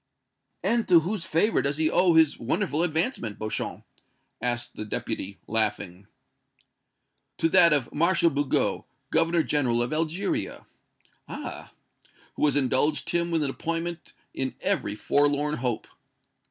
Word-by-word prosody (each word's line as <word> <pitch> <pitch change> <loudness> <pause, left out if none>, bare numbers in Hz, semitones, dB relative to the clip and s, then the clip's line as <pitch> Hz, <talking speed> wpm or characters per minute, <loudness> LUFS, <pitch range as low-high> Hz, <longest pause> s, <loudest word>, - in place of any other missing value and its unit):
"And 235 -1 +1
to 175 -3 +6
whose 185 +2 -3
favor 170 +8 +2
does 140 +1 -1
he 155 0 +2
owe 175 +1 +3
his 160 -2 +4
wonderful 155 - 0
advancement, 160 - -1
Beauchamp?" 110 0 -4 0.6
asked 120 0 -2
the - - -5
Deputy, 100 -2 -4
laughing. 105 -4 -2 1.3
"To 165 - +2
that 175 -1 +6
of 140 -5 +1
Marshal 170 +1 +3
Bugeaud, 140 -1 0 0.3
Governor 165 0 +2
General 125 -6 +1
of 120 - -3
Algeria." 165 +5 -2 0.6
"Ah!" - - -7 0.6
"Who - - -3
has 145 - +2
indulged 145 +2 +1
him 170 0 0
with 165 -2 +1
an 140 - -1
appointment 165 +2 -4 0.2
in 130 0 -3
every 185 - -1
forlorn 145 +4 +1
hope!" 120 -2 -2
150 Hz, 130 wpm, -26 LUFS, 125-170 Hz, 1.3 s, to